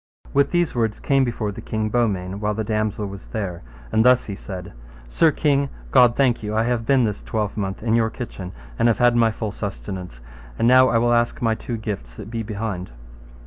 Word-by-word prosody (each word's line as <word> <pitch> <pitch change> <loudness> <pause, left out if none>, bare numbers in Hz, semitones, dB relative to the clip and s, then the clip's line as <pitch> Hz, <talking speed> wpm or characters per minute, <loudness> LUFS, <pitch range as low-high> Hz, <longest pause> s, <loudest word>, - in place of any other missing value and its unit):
With 140 0 +3
these 175 -2 +1
words 115 -3 -1
came 135 -1 +2
before 115 -4 -2
the - - -8
king 110 -1 -2
Beaumains, 100 -5 0
while 105 0 0
the 110 - -1
damosel 110 -1 -1
was 100 -1 -8
there, 95 -6 -4 0.3
and 110 - +3
thus 125 0 +5
he 100 - -5
said, 95 -2 -8 0.3
Sir 160 - +3
king, 140 -2 +1 0.2
God 125 -2 +6
thank 130 -4 +2
you, 105 0 -3
I 110 - +3
have 115 -1 -1
been 135 -2 +4
this 105 -2 -1
twelvemonth 105 -2 -3
in 115 -1 +1
your 115 -1 +3
kitchen, 100 -6 -7 0.3
and 115 - +4
have 115 -3 +3
had 120 -1 +4
my 115 -1 +4
full 110 -1 -4
sustenance, 95 - -6 0.4
and 115 - +2
now 130 +1 +7
I 115 - +3
will 120 +1 +3
ask 120 0 +1
my 115 -2 +2
two 115 +1 -4
gifts 100 - -5
that 105 - -9
be 115 -1 -2
behind. 105 -4 -4
110 Hz, 210 wpm, -22 LUFS, 100-120 Hz, 0.4 s, now